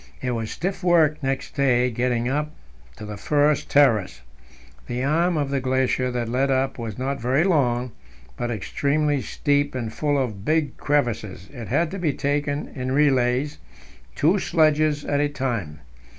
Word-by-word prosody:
It 125 - -2
was 115 -2 -3
stiff 190 +1 -4
work 160 -4 +3
next 135 -1 -3
day 125 -3 +2
getting 120 0 0
up 150 +3 -1 0.5
to 105 - -8
the 105 0 -7
first 145 +6 +1
terrace. 115 - +3 0.7
The 125 +1 -3
arm 165 +4 +2
of 140 -2 -1
the 140 - +1
glacier 130 0 0
that 120 -2 -2
led 130 +4 0
up 135 0 0
was 110 -3 -5
not 135 +1 -3
very 130 +6 +2
long, 130 -9 +1 0.4
but 120 - -3
extremely 140 +6 0
steep 145 +4 0
and 115 -3 -4
full 145 +1 0
of 110 -8 -2
big 155 +1 0
crevasses; 115 -9 -1
it 120 -5 -7
had 155 +6 +1
to 195 - -5
be 160 -5 0
taken 145 +1 -1
in 130 -1 -4
relays, 135 -1 +2 0.6
two 175 +7 +3
sledges 155 -3 +2
at 145 - 0
a 145 0 +1
time. 115 - -3
135 Hz, 165 wpm, -23 LUFS, 120-150 Hz, 0.7 s, work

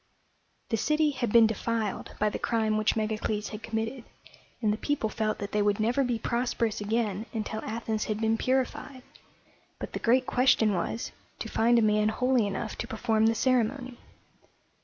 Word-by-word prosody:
The 225 - +1
city 305 +6 +2
had 240 -5 -2
been 230 0 +7
defiled 220 -1 -2
by 210 - +2
the - - -5
crime 220 -2 +1
which 215 0 +1
Megacles 215 -1 -2
had 215 0 -7
committed, 225 +3 -3 0.6
and 215 -3 +1
the - - -3
people 280 -4 -1
felt 215 -1 -1
that 200 -1 -5
they 210 - +1
would 205 0 +1
never 240 +5 +2
be 245 -2 0
prosperous 235 -2 -1
again 215 0 -1
until 220 -1 -3
Athens 220 -1 -2
had 215 -1 -2
been 225 0 +2
purified; 260 +2 -1 0.7
but - - -7
the - - -3
great 255 +2 +3
question 245 -5 +3
was 190 +5 -2 0.3
to - - -5
find 235 +2 +3
a 230 - +4
man 210 0 +3
holy 250 -1 +2
enough 210 +2 -4
to 235 - -3
perform 220 -3 +1
the 225 - +2
ceremony. 255 +1 0
225 Hz, 175 wpm, -28 LUFS, 215-245 Hz, 0.7 s, been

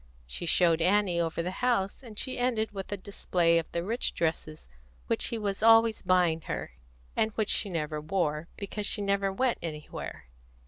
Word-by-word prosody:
She 115 - -6
showed 165 -1 +4
Annie 185 -1 +3
over 165 0 -1
the 180 - -2
house, 235 -5 +1
and 225 -5 -12
she 255 +1 -2
ended 235 -3 0
with 195 -1 -7
a 205 - -2
display 175 -3 +1
of 165 - -7
the 170 - -2
rich 230 +6 -1
dresses 160 - -2 0.4
which - - 0
he 230 - -2
was 200 -2 -3
always 225 0 +6
buying 180 -3 +2
her, - - -3 0.4
and 220 - +2
which 215 -1 0
she 205 - +2
never 155 -3 -2
wore, 155 -2 -1
because 205 0 -4
she 205 - 0
never 200 0 +1
went 250 +5 0
anywhere. 155 -3 -6
190 Hz, 180 wpm, -29 LUFS, 165-215 Hz, 0.4 s, always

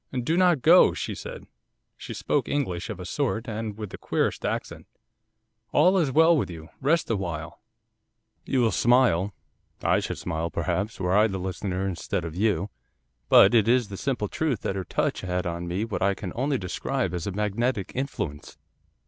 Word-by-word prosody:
'"Do 160 +7 +1
not 175 -6 +3
go," 175 +3 +7
she - - -3
said; - - -8 0.5
she - - -9
spoke - - -1
English 115 -11 -2
of 105 -4 -5
a 90 - -6
sort, 125 +1 -2
and 110 -1 -4
with 105 -3 -6
the - - -8
queerest - - -1
accent. - - -4 0.9
"All 180 +6 +5
is 150 -6 +1
well 160 +4 +5
with 145 - 0
you. 80 -1 -9
Rest 155 0 +1
awhile." 85 -6 -4 0.8
'You 130 - 0
will 115 -2 +3
smile, 110 -3 +3 0.5
I - - +3
should - - -4
smile, 80 +1 -3
perhaps, 85 +7 -2
were 90 0 +1
I 105 +2 +5
the 95 -3 -4
listener 95 +1 -3
instead 90 0 -3
of 80 -1 -6
you, 100 0 0 0.6
but 100 - +7
it 110 -3 +4
is 120 -2 +3
the 100 - -6
simple 115 -1 -2
truth 140 -1 -1
that 95 - -2
her 95 -2 -3
touch - - -1
had 90 0 -2
on 85 0 -3
me 90 +5 -1
what 115 - -4
I 100 +1 +2
can 95 -2 -6
only 135 +3 0
describe 100 +2 -2
as 90 0 -3
a - - -1
magnetic 105 +2 -1
influence. 125 - -4
105 Hz, 180 wpm, -26 LUFS, 90-130 Hz, 0.9 s, go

